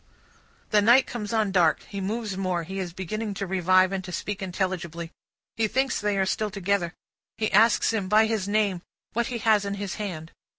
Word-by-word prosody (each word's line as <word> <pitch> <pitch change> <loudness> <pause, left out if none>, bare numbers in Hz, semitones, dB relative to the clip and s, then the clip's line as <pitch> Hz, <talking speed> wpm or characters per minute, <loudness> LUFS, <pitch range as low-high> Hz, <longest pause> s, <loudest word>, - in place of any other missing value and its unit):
The 210 - +5
night 240 +5 +6
comes 210 -5 -5
on 220 -3 +1
dark. 170 -5 +3
He 200 -1 -6
moves 210 +1 -3
more; 185 -3 -1
he 190 +4 -6
is 180 -2 -3
beginning 200 +4 -4
to 195 - -3
revive, 185 0 +3
and 195 -1 -3
to 180 - -7
speak 205 +3 -4
intelligibly; 175 -3 -3 0.5
he 225 -1 +2
thinks 265 +2 0
they 205 -1 0
are 190 - +2
still 215 +2 -1
together; 195 -3 -1 0.4
he 215 - -1
asks 225 +2 +4
him, 200 -4 -2
by 215 +1 +5
his 220 -3 -1
name, 205 -4 +1 0.3
what 235 +1 0
he 250 -3 -3
has 215 -2 +3
in 200 0 -3
his 200 -1 -5
hand. 165 -6 -5
200 Hz, 200 wpm, -26 LUFS, 185-215 Hz, 0.5 s, night